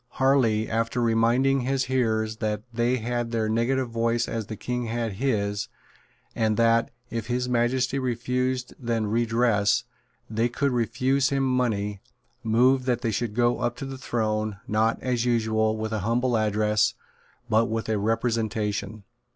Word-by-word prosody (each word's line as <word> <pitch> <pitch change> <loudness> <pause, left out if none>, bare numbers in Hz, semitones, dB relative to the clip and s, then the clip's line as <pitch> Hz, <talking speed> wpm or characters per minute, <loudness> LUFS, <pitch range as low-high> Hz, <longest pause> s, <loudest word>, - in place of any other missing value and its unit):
Harley, 125 -5 +2
after 115 +2 -1
reminding 120 +4 +3
his 130 +1 0
hearers 110 -4 0
that 105 -2 -2
they 120 +2 +1
had 120 0 -2
their 115 -2 0
negative 120 +3 0
voice 115 +1 0
as 115 -3 -4
the 110 - -5
King 125 +2 -3
had 115 -1 -2
his, 105 -6 0 0.7
and 110 -1 0
that, 115 0 +3 0.2
if 115 -2 -3
His 125 0 -1
Majesty 125 +2 +1
refused 125 0 -1
then 115 -3 -1
redress, 115 -2 +2 0.4
they 115 +2 0
could 140 +3 0
refuse 125 +3 +1
him 135 -1 0
money, 110 -6 0 0.4
moved 125 +3 +3
that 120 -2 0
they 115 -3 0
should 110 0 -2
go 120 0 +2
up 120 - -1
to 130 - -6
the 135 0 -6
Throne, 110 -4 -1
not, 110 +2 +1
as 125 -2 0
usual, 110 -2 +1
with 110 0 -3
a 110 - -1
Humble 120 +5 +1
Address, 105 -1 +2 0.5
but 115 0 +3
with 115 -1 -3
a 110 -2 0
Representation. 110 -2 -1
115 Hz, 150 wpm, -25 LUFS, 110-125 Hz, 0.7 s, reminding